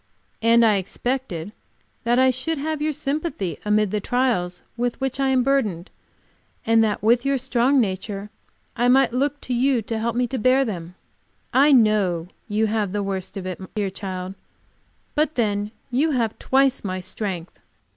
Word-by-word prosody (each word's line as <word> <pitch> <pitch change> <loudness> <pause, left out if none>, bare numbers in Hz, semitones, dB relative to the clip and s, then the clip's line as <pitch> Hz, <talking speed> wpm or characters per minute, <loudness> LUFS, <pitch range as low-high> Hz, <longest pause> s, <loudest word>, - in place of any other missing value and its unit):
And 230 +1 +5
I 215 -2 +4
expected 205 -2 -3 0.5
that 240 +1 +3
I 260 0 +5
should 280 +6 -2
have 310 +1 -3
your 310 +1 +1
sympathy 280 - -3
amid 210 -1 +2
the 210 - 0
trials 205 -7 0
with 240 0 -2
which 270 0 -2
I 270 - +2
am 260 -1 +3
burdened, 215 -10 0 0.7
and 225 0 +4
that 210 -1 -1
with 235 +2 +4
your 275 0 +1
strong 260 +1 +2
nature 200 -1 -2 0.4
I 245 +1 +2
might 260 -1 +4
look 285 +3 0
to 250 - -4
you 250 -1 +2
to 225 +1 -3
help 235 +1 -1
me 245 +1 +2
bear 255 +2 +2
them. 180 -5 -6 0.6
I 280 +3 +5
know 205 -9 +3 0.2
you 215 0 +1
have 210 -3 -1
the 205 -1 -1
worst 190 -1 -4
of 190 - -5
it, 185 -1 -5 0.2
dear 205 -3 -1
child, 185 -1 -5 0.8
but 305 0 +1
then 205 -3 0 0.2
you 280 +6 +2
have 230 -4 -1
twice 270 0 +2
my 185 -2 -3
strength. 185 -2 -5
230 Hz, 165 wpm, -23 LUFS, 200-265 Hz, 0.8 s, And